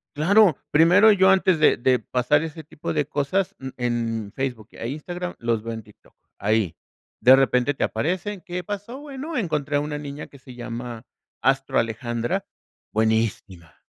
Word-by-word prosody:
claro, 180 +2 +5
primero 180 +8 +6
yo 190 -1 +5
antes 185 -3 +3
de 155 - +5
de 125 0 +2
pasar 125 +6 +1
ese 160 0 -7
tipo 150 0 -6
de 150 - +1
cosas, 145 +6 -1
mm, 130 - -6
en 115 -4 -2
Facebook 120 -5 -4
e 115 - -6
Instagram, 175 +6 -5
los 115 -2 -1
veo 115 0 -4
en 110 -1 -7
TikTok, - - -22 0.2
ahí. 105 -5 +1 0.4
De 130 +2 +8
repente, 135 +1 +2
te - - -2
aparecen, 185 +4 -2
¿qué 180 +1 -5
pasó? 205 +7 -6
Bueno, 290 +2 -6
encontré 150 - -1
a - - +2
una 150 0 -4
niña 145 0 -7
que 140 - -16
se 130 -1 -13
llama 120 -1 -6 0.4
Astro 135 0 +1
Alejandra, 115 +1 -2 0.5
buenísima, 110 -6 -1
140 Hz, 165 wpm, -24 LUFS, 115-175 Hz, 0.5 s, De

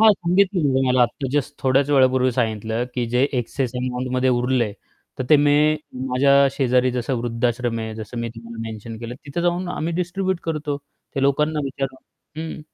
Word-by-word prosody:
हां, 220 -1 +8
सांगितलेल 180 -1 +2 0.2
मला 125 -1 +4
आता 120 +3 -1
जस्ट 145 0 0
थोड्याच 135 +2 +3
वेळापूर्वी 130 -2 +4
सांगितलं, 110 -1 -1
की 125 - 0
जे 125 +2 +2 0.2
एक्सेस 125 +1 -2
अमाउंटमध्ये 125 +1 -1
उरले, 125 -3 +1 0.5
तर 130 - -1
ते 155 - +9
मी 145 0 +4 0.5
माझ्या 130 +2 +3 0.2
शेजारी 130 -1 +2
जसं 125 +2 -1
वृद्धाश्रम 120 0 -1
आहे 110 0 -5
जसं 110 +2 -7
मी 115 - -2
तुम्हाला 115 0 -9
मेन्शन 110 +1 -7
केलं 120 +1 -6
तिथं 145 +4 -3
जाऊन 175 +1 0
आम्ही 165 +2 -2
डिस्ट्रीब्यूट 185 0 -2
करतो 150 -3 -2 0.4
ते 135 - -1
लोकांना 150 +3 +2
विचाराव. 135 -1 -4 0.4
हं 160 -1 -5
130 Hz, 165 wpm, -22 LUFS, 120-150 Hz, 0.5 s, ते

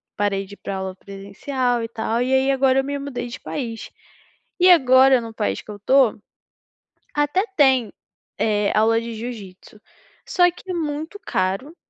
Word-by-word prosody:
parei 200 -1 -1
de 200 - -13
ir - - -12
pra 195 -1 -5
aula 190 -1 -5
presencial 230 +6 -3
e - - -3
tal, 230 +1 -2
e 255 +1 0
aí 265 +1 +3
agora 270 0 +3
eu - - +1
me 285 +1 -3
mudei 275 -3 -5
de 255 +4 -8
país, 230 -6 -5 0.7
e 365 +1 +6
agora 260 -5 +6
no 225 -1 -8
país 100 - -2
que - - -22
eu 205 - -8
tô, 260 +2 +3 1.0
até 295 +7 +1
tem, 260 -7 +3 0.5
eh, 210 -1 +1
aula 225 +1 +3
de 230 0 -6
jiu-jitsu, 215 -3 -9 0.5
só 355 -1 +3
que 365 +1 -9
muito 315 +4 -4
caro 195 - -2
245 Hz, 165 wpm, -22 LUFS, 210-275 Hz, 1.0 s, e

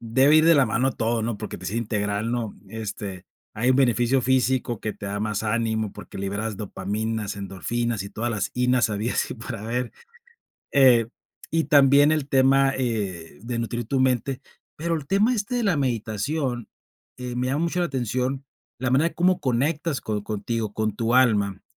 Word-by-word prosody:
debe 130 +6 +4
ir 155 - +5
de 165 0 +6
la 140 -3 +5
mano 125 +3 +1
todo, 115 0 -1
¿no?, 115 -1 -2
por 105 +1 -6
que, - - -7
pues, 90 +2 -5
es 115 - -3
integral, 105 -1 -1
¿no?, 120 -3 -2
este, 100 -3 -6 0.3
hay 120 +4 +1
un - - +5
beneficio 125 0 +3
físico 130 -2 +1
que 110 - -3
te 105 0 -8
da 100 +1 -3
más 105 0 -2
ánimo, 110 -1 0
porque - - -10
liberas 100 +2 -3
dopamina, 105 +2 -3
endorfinas, 100 +3 -3
y 100 - -8
todas 120 +2 -3
las 110 -3 -2
inas 125 -2 +2
habidas 105 +3 -1
y - - -5
por 115 -1 -6
haber, 115 +3 -3 0.8
eh, 125 -5 +5 0.4
y 165 +1 +1
también 145 0 +5
el 155 -3 0
tema, 135 0 +4
eh, 100 - -3
de 120 +2 -4
nutrir 115 0 -3
tu 135 +3 0
mente, 130 0 +1 0.4
pero 165 +2 -1
el 150 -4 -3
tema 210 - +3
este 220 +2 -2
de 240 - 0
la 200 -5 +2
meditación, 125 0 -2 0.5
eh, 125 -1 -5
me 125 +1 -1
llama 140 +5 0
mucho 170 +1 -1
la 175 - +1
atención, 130 +1 -2 0.3
la 125 -1 -1
manera 145 +6 +3
de - - -19
cómo 180 +1 +3
conectas 145 +3 0
co 105 -2 -3
contigo, 110 +1 -3
con 110 -1 -2
tu 115 +2 0
alma. 105 -6 +3
120 Hz, 185 wpm, -24 LUFS, 110-135 Hz, 0.8 s, de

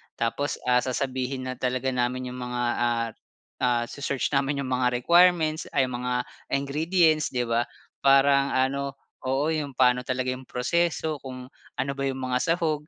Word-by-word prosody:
Tapos, 115 +5 -1
ah, 125 0 +4
sasabihin 130 0 -2
na - - -9
talaga 130 +1 0
namin 125 0 -1
'yong 125 - -7
mga, 125 0 -3 0.2
ah, 120 -1 +1 0.5
ah, 120 -1 +2
se-search 140 -1 -2
namin 140 0 +1
'yong 130 - -5
mga 125 0 +2
requirements 170 +2 +4
ay 135 - +4
'yong 125 -2 -3
mga 125 0 -2 0.4
ingredients, 155 +3 +2
'di 125 -1 -1
ba, 115 0 0 0.3
parang 140 0 +4
ano 140 +1 0 0.3
oo, 140 +4 +1
'yong 145 -4 -3
paano 125 0 +4
talaga 130 0 -1
'yong 130 0 -7
proseso, 160 +3 0
kung 130 -1 -9 0.2
ano 140 - -1
ba 140 0 -4
'yong 135 -1 -3
mga 125 0 0
sahog. 160 -1 0
130 Hz, 165 wpm, -26 LUFS, 125-140 Hz, 0.5 s, ah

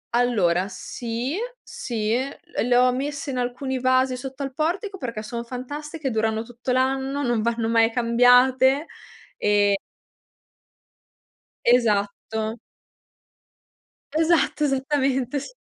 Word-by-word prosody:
Allora, 195 -7 +2
sì, 235 - -4 0.3
sì, 220 -2 -3
l 280 +7 -4
le 245 - +3
ho 250 0 +5
messe 280 +2 -3
in 255 - -4
alcuni 255 +2 -2
vasi 255 0 +2
sotto 265 +2 -6
al 270 -1 -5
portico, 375 +7 -2
perché 230 -5 -4
sono 235 +1 -5
fantastiche, 290 +4 -5
durano 220 0 0
tutto 245 +2 -5
l'anno, 265 +2 0
non 240 -3 +1
vanno 230 0 0
mai 230 0 +3
cambiate 250 +4 +4 0.5
e 205 -1 +3 1.9
Esatto. 220 -1 +1 1.6
Esatto, 315 -2 +2
esattamente 270 -1 0
s - - -10
250 Hz, 105 wpm, -24 LUFS, 230-275 Hz, 1.9 s, ho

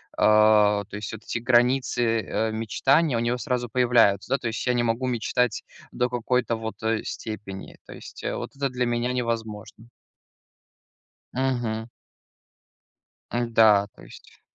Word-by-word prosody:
а, 105 -1 +4
то 100 - -10
есть 105 +1 -6
вот 110 0 -9
эти 115 - -3
границы, 120 -1 +2
э, 110 +3 -2
мечтаний 130 +7 +1
у - - +1
него 120 +1 0
сразу 125 -3 -2
появляются, 120 -5 +3
да. - - 0
То 120 - -5
есть 110 - -3
я 125 - +3
не 120 - +1
могу 120 +3 -1
мечтать 125 0 0 0.3
до 125 0 -1
какой-то 120 -1 0
вот, 110 0 -6
э, 110 0 0
степени, 100 -3 -7
то - - -10
есть, - - -11
э, - - -2
вот - - -7
это 140 -1 -1
для 125 0 -1
меня 120 +1 -1
невозможно. 115 -2 -4 1.4
Мгм. 120 -4 -2 1.4
М-да, 115 -4 +4
то - - -16
есть. - - -16
115 Hz, 150 wpm, -25 LUFS, 110-125 Hz, 1.4 s, а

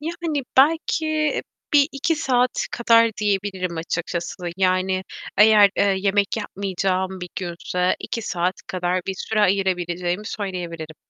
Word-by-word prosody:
Yani 320 -3 -3
belki 310 +1 +2 0.3
1-2 290 +2 +2
saat 250 -4 +1
kadar 230 -1 +4
diyebilirim 195 -4 -1
açıkçası. 170 +1 -3 0.2
Yani 185 0 +1 0.3
eğer, 210 -1 +7
eee, - - +3 0.2
yemek 200 +1 +1
yapmayacağım 190 -2 -2
bir 180 - -6
günse 180 0 -1
2 230 - -4
saat 180 -1 -1
kadar 180 0 -1
bir 195 - -2
süre 215 +3 -2
ayırabileceğimi 180 -1 0
söyleyebilirim. 175 -7 -5
195 Hz, 115 wpm, -22 LUFS, 180-230 Hz, 0.3 s, eğer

